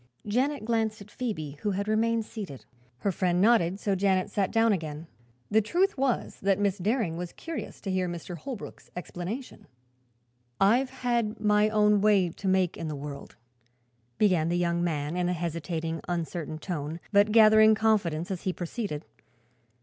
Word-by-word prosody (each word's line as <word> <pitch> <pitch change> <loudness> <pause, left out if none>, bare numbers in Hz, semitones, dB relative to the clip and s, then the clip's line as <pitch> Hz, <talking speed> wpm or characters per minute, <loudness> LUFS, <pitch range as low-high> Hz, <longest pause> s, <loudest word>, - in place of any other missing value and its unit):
Janet 255 +4 0
glanced 220 -2 0
at 205 +1 -12
Phoebe, 155 - -4
who 210 - 0
had 200 +1 -2
remained 225 +1 +1
seated. 190 - -8 0.4
Her 200 - +1
friend 180 -1 +1
nodded, 195 -3 +3
so 200 - 0
Janet 190 0 +1
sat 200 -2 0
down 225 -1 +4
again. 155 -3 -4 0.5
The 220 +1 +5
truth 360 - +1
was 265 -2 -1
that 195 0 +2
Miss 205 -1 0
Daring 205 -4 0
was 175 0 -5
curious 325 -2 -6
to 195 - -3
hear 185 -1 0
Mr. 175 +1 -6
Holbrook's 225 - -8
explanation. 180 +8 -6 0.9
"I've 240 +7 +4
had 240 -4 -1
my 210 0 +3
own 210 -1 +3
way 200 -4 +4
to 190 +4 -6
make 185 -2 +2
in 165 - -4
the 155 - -3
world," 140 0 -8 0.8
began 180 -6 +3
the 175 - +1
young 170 0 +1
man, 155 -2 -1
in 180 0 0
a - - +1
hesitating, 165 -1 -3
uncertain 165 -2 -3
tone, 155 -1 -4
but 205 +1 +4
gathering 215 0 +7
confidence 200 -7 +1
as 185 - -3
he 185 - -1
proceeded. 175 -3 -4
195 Hz, 165 wpm, -28 LUFS, 170-215 Hz, 0.9 s, gathering